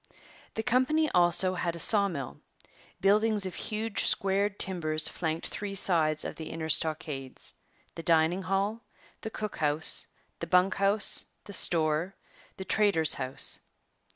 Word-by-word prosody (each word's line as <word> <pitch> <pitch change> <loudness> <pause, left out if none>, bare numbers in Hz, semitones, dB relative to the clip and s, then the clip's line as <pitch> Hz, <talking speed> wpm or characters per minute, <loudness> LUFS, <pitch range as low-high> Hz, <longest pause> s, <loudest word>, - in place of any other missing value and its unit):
The 220 - -3
company 260 +6 +1
also 175 +1 +2
had 175 -2 -3
a - - -7
saw 200 +3 +3
mill. 140 -8 -7 0.6
Buildings 210 +1 +2
of 185 - -5
huge, 215 +2 -2
squared 200 +1 0
timbers 155 -4 +1
flanked 160 -1 -4
three 200 -1 -6
sides 155 -5 +1
of - - -7
the 160 - -8
inner 160 -1 -6
stockades 150 -5 -2 0.4
the - - -8
dining 165 +2 +2
hall, 195 +4 -2 0.4
the 220 - -6
cook 215 -1 -6
house, 150 +1 +3 0.3
the - - -6
bunk 180 +1 +2
house, 200 +1 +2 0.2
the 200 - -8
store, 165 +1 +4 0.4
the 190 - -7
trader's 195 -8 +1
house. 130 +1 -1
185 Hz, 140 wpm, -28 LUFS, 160-205 Hz, 0.6 s, store